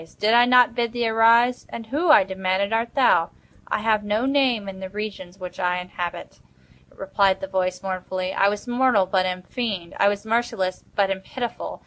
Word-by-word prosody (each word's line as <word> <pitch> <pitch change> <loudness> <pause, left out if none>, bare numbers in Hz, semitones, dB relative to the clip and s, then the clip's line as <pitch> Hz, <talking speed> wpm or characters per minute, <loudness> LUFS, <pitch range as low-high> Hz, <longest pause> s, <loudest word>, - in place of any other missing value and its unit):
did 215 +2 +2
I 240 +1 +6
not 250 -1 +5
bid 235 -1 -2
thee 240 -1 -1
arise?" 230 +2 +3
"And 230 - -7
who," 300 +9 -1
I 300 -8 +7
demanded, 190 +2 -2
"art 230 +1 -1
thou?" 210 -11 +3 0.4
"I - - -2
have 215 -1 +1
no 210 +4 -1
name 265 -7 +1
in 190 -1 -8
the 190 0 -7
regions 195 -3 -7
which 180 -1 -9
I 180 -1 0
inhabit," 180 -1 -6 0.5
replied 195 0 0
the - - -5
voice, 185 -1 -2
mournfully; 185 0 -4
"I 200 - +3
was 205 +3 -5
mortal, 245 -5 +2
but 185 0 0
am 180 0 -4
fiend. 200 -7 -4
I 200 - +4
was 205 +1 -1
merciless, 220 -5 -1
but 195 -1 +2
am 190 -1 -3
pitiful. 240 +3 -6
205 Hz, 190 wpm, -23 LUFS, 185-235 Hz, 0.5 s, I